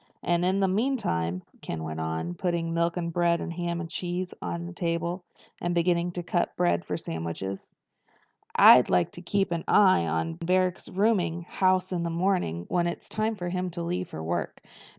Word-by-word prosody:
"And 175 0 +1
in 190 +2 +2
the 195 - +4
meantime," 185 - 0 0.2
Ken 80 -1 -5
went 80 0 -5
on, 80 +2 -2
putting 170 - -1
milk 170 +1 0
and 170 -1 -2
bread 170 0 +2
and 170 - -4
ham 170 0 -2
and 170 - -4
cheese 180 +1 -3
on 85 -1 -4
the 85 - -7
table, 170 - -2 0.4
and 175 0 -1
beginning 170 0 +2
to 175 - -4
cut 175 0 -1
bread 175 0 +1
for - - -3
sandwiches, 85 - -5 0.8
"I'd - - +8
like 90 - +2
to 175 - -10
keep 195 +1 0
an 170 -1 -1
eye 185 - +5
on 80 0 -1
Barrack's 185 +1 +1
rooming 185 -4 +1
house 185 +1 +1
in 180 -2 -1
the 170 - -1
morning 170 - 0
when 175 -1 +1
it's 170 - -5
time 220 +1 -1
for 175 -3 -4
him 180 0 -2
to 170 - -2
leave 180 +1 -2
for 80 - -6
work. 85 +2 -3
170 Hz, 190 wpm, -27 LUFS, -, 0.8 s, I'd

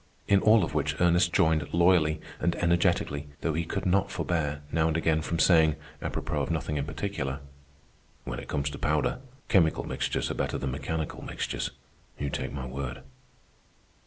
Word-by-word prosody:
In 100 -1 +5
all 110 -2 +6
of 80 - -3
which 75 0 -1
Ernest 85 0 +4
joined 80 -5 +2
loyally 85 -3 +4 0.2
and 85 - +1
energetically, 85 -4 +1
though 80 - 0
he 85 +2 0
could 90 - -3
not 95 +1 +2
forbear, 75 -4 -2
now 80 0 +2
and 80 0 +1
again, 80 -1 +2
from 85 +1 -2
saying, 80 -2 +5 0.3
apropos - - -2
of - - -2
nothing 75 -2 -1
in 70 - -1
particular, 75 -4 -3 0.8
"When - - -5
it - - -9
comes 70 0 -1
to 70 - -8
powder, 75 - +1 0.3
chemical 80 -5 +3
mixtures - - -2
are - - -1
better - - -2
than 65 -1 -2
mechanical 80 +3 -3
mixtures, - - -3 0.5
you 70 -1 -3
take - - -3
my 70 -3 -5
word." 65 0 -5
80 Hz, 170 wpm, -28 LUFS, 70-85 Hz, 0.8 s, all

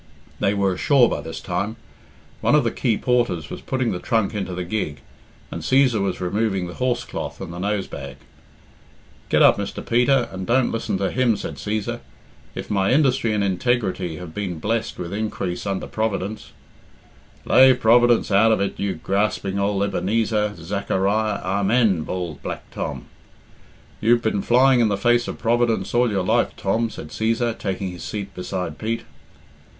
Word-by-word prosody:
They 100 - +1
were 100 -2 +1
ashore 125 +6 +4
by - - -2
this 80 +2 -7
time; 100 +5 -3 0.7
one - - +3
of - - +4
the - - 0
quay 115 -4 0
porters 120 - 0
was - - -6
putting 130 -3 -1
the 90 - -3
trunk 110 -1 0
into 95 -3 -3
the 90 - -3
gig, 85 -7 -3 0.5
and - - -5
Cæsar 130 -5 +3
was 100 -2 -1
removing 95 +1 -1
the 90 - -7
horse 125 +1 -1
cloth - - -6
and 85 - -7
the 85 - -7
nose 100 +1 -1
bag. - - -8 1.1
"Get - - +4
up, - - +6
Mr. - - -5
Peter, 125 +2 +3
and 95 0 -6
don't 130 +1 +2
listen 115 -3 -2
to 95 0 -1
him," 125 -4 +2
said - - -6
Cæsar. 105 0 -3 0.6
"If - - -6
my 95 -1 +2
industry 130 -5 +3
and 105 -1 +1
integrity 95 -3 0
have 85 -1 -9
been 95 -4 -3
blessed 110 +7 -2
with 90 +1 -5
increase 100 -3 -3
under 95 -1 -2
Providence 110 -1 -3 0.5
" - - -29
"Lave 130 -1 +6
Providence 120 0 +4
out 105 +3 +5
of 110 - +2
it, 100 - -2
you 100 -2 -1
grasping 100 +2 -1
ould 100 0 +1
Ebenezer, 105 +1 0
Zachariah, 100 +4 -1
Amen," 100 0 +2
bawled 85 -4 -5
Black - - -5
Tom. - - -5 1.0
"You've 120 +2 +3
been 105 -3 0
flying 130 +3 +4
in 115 - +4
the 100 -1 0
face 120 +3 +2
of - - -5
Providence 120 -1 +1
all 120 0 +3
your 100 -3 0
life, 115 +4 +1
Tom," 115 +4 0
said 75 - -9
Cæsar, 115 +4 0
taking 95 -2 -3
his 90 - -9
seat 100 -2 -5
beside 90 -3 -4
Pete. 115 +1 -2
105 Hz, 175 wpm, -22 LUFS, 95-115 Hz, 1.1 s, up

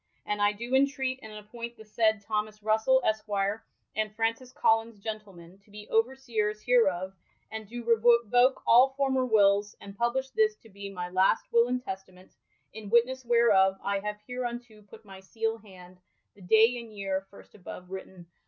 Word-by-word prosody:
And 210 0 -2
I 205 0 +4
doe 235 +4 -8
intreat 265 -1 +1
and 220 - -10
appoint 230 +3 -9
the 220 - -12
aaied 220 -1 0
Thomass 215 -1 -3
Russell 220 +5 +2
esquier 210 -1 -1 0.3
and 215 0 -1
Frauncis 230 +3 -1
Collins 225 -2 +1
gent, 215 +1 -5
to 190 +1 -17
be 210 +1 -11
overseers 225 -3 0
hereof, 195 -7 +2 0.4
and 220 -2 -7
doe 240 +1 -7
revoke 235 +2 +3
all 260 +3 +5
former 265 -2 +1
wills, 205 -2 +3
and 200 0 -11
publishe 255 +4 -1
this 435 -1 +2
to 225 - -20
be 200 0 -9
my 180 -2 -5
last 185 +1 +2
will 235 0 +5
and 250 0 -2
testament 190 -2 -9 0.4
In 210 -1 -9
witness 245 +3 +2
whereof 215 -6 +4
I 200 0 -1
have 210 +1 -5
hereunto 240 -3 -6
put 205 +1 -16
my 195 -1 -12
[seale] 225 +3 -3
hand, 185 -4 -16 0.3
the 200 - -20
dale 225 +6 +3
and 225 - -14
yeare 195 -1 -3
first 200 - -17
above^vritten. 185 -1 -10
220 Hz, 165 wpm, -28 LUFS, 200-240 Hz, 0.4 s, all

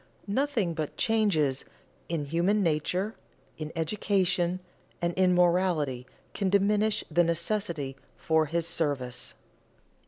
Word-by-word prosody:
Nothing 220 -5 0
but 155 -2 -4
changes 185 -12 +2 0.5
in 165 -3 -1
human 175 +7 +2
nature, 180 +6 0 0.5
in 155 0 -4
education, 180 0 +1 0.4
and 170 0 0
in 185 0 +3
morality 170 -8 +2 0.3
can 195 -2 0
diminish 205 +2 +2
the 175 +3 +4
necessity 170 -4 -1 0.2
for 160 -1 +2
his 170 +2 -1
service. 140 -7 -1
175 Hz, 105 wpm, -28 LUFS, 155-200 Hz, 0.5 s, the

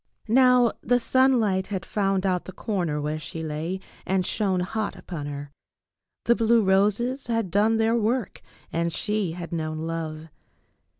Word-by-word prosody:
Now 250 0 +5
the 245 - +3
sunlight 235 -7 +2
had 195 -2 -4
found 195 -2 0
out 180 -2 0
the - - -7
corner 180 -9 -2
where 150 +1 -2
she 160 +1 -6
lay 160 +4 -3 0.2
and 190 -1 0
shone 190 -4 0
hot 215 +3 -2
upon 155 -6 -6
her. 145 0 -6 0.7
The 235 - +5
blue 230 -1 +3
roses 210 +7 +1
had 230 -6 -1
done 215 +4 +3
their 225 +1 +2
work 230 -1 -1 0.3
and 170 0 0
she 210 -1 -1
had 170 0 -7
known 155 -1 -2
love. 160 -1 -4
190 Hz, 155 wpm, -25 LUFS, 165-225 Hz, 0.7 s, Now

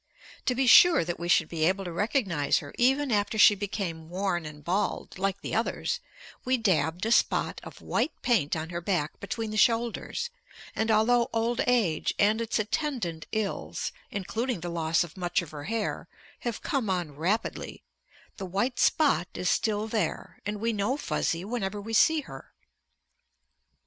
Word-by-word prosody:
To 250 - +2
be 265 +2 +1
sure 330 - +7
that 175 -1 -4
we 170 - -4
should 175 - +4
be 160 -2 -2
able 190 +4 +1
to 175 - -4
recognize 190 - +1
her 145 -2 -6
even 265 +2 +2
after 210 +1 +1
she 210 - +8
became 190 -5 -4
worn 180 -3 -1
and 150 -1 -11
bald, 185 +2 -2
like 195 +1 -1
the - - -5
others, 225 - -1 0.4
we 255 0 +2
dabbed 180 -5 +1
a 225 - 0
spot - - +2
of - - -11
white 315 - -1
paint 220 - +2
on 160 +1 -4
her 170 0 -4
back 170 -4 -1
between 220 +2 -4
the 215 - -3
shoulders, 235 - +1 0.4
and 220 +1 0
although 235 +2 +3
old 230 +1 0
age 220 -11 +1
and 215 +2 +3
its 230 - -1
attendant 215 - -2
ills, 215 -2 -3 0.2
including 220 +2 -3
the 175 - -4
loss 165 -1 +1
of 170 +1 -11
much 175 -1 0
of 165 - -11
her 145 -1 -7
hair, 225 0 -2 0.3
have 235 -3 -4
come 260 -8 -1
on 175 -6 -2
rapidly, 185 +9 -2 0.5
the 195 - -5
white 205 +8 -1
spot 290 - +3
is 180 - 0
still 215 -1 0
there, 220 -1 -3
and 210 0 -3
we 230 +2 0
know 210 +6 0
Fuzzy 170 - -1
whenever 210 -2 -3
we 225 +3 -7
see 315 +7 +4
her. - - -12
205 Hz, 170 wpm, -28 LUFS, 175-230 Hz, 0.5 s, she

